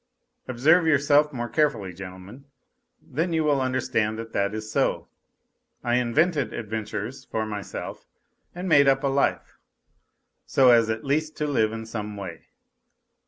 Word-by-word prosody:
Observe 155 +8 +3
yourselves 145 0 +4
more 120 -3 -4
carefully, 115 - 0
gentlemen, 95 +8 -10 0.5
then 165 +5 -3
you 160 -1 +1
will 145 -3 +2
understand 125 -4 0
that 115 0 -8
it 100 +1 0
is 110 0 -6
so. - - 0 0.8
I 120 0 +2
invented 140 +2 +1
adventures 110 +4 -5
for 110 -2 -2
myself 105 -2 -6 0.5
and 180 +2 -5
made 145 -4 +5
up 135 0 +3
a - - +2
life, 140 +1 -1 0.9
so 130 -2 +5
as 115 -2 +4
at 110 0 -3
least 155 +3 -1
to 150 - -1
live 110 -7 +1
in 110 0 -6
some 105 -2 -6
way. 90 -5 -8
125 Hz, 145 wpm, -25 LUFS, 110-145 Hz, 0.9 s, made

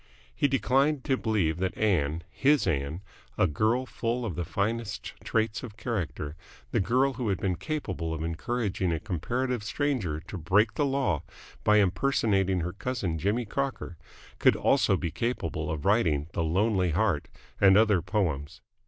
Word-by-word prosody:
He 145 - +2
declined 135 +1 +2
to 135 - +2
believe 100 -10 0
that 95 0 -2
Ann, 85 -6 +1
his 145 +1 +3
Ann, 80 +1 -1 0.3
a - - +4
girl 110 - +1
full 120 -1 -2
of 105 - -3
the 85 - -3
finest 105 +5 -2
traits 110 -1 0
of 110 -4 -9
character, 90 - -3 0.4
the - - +2
girl 130 +7 +2
who 125 -3 -2
had 95 - +1
been 95 -2 0
capable 140 - -3
of 80 0 -3
encouraging 95 +2 -1
a 80 - -1
comparative 120 +7 -2
stranger 110 - -1
to 95 +1 -7
break 105 +7 +3
the 145 - +1
law 135 - 0 0.4
by 105 0 +5
impersonating 95 -2 +2
her 90 +2 -3
cousin 100 -7 -2
Jimmy 105 +8 0
Crocker, 135 -6 -3 0.4
could - - +5
also - - +3
be 85 - -3
capable 85 -7 -2
of 80 +1 -4
writing 85 -9 +3
The 85 - 0
Lonely 95 +2 +2
Heart - - +1 0.3
and 95 0 +7
other 105 -4 +4
poems. 80 -9 -2
100 Hz, 160 wpm, -28 LUFS, 85-120 Hz, 0.4 s, and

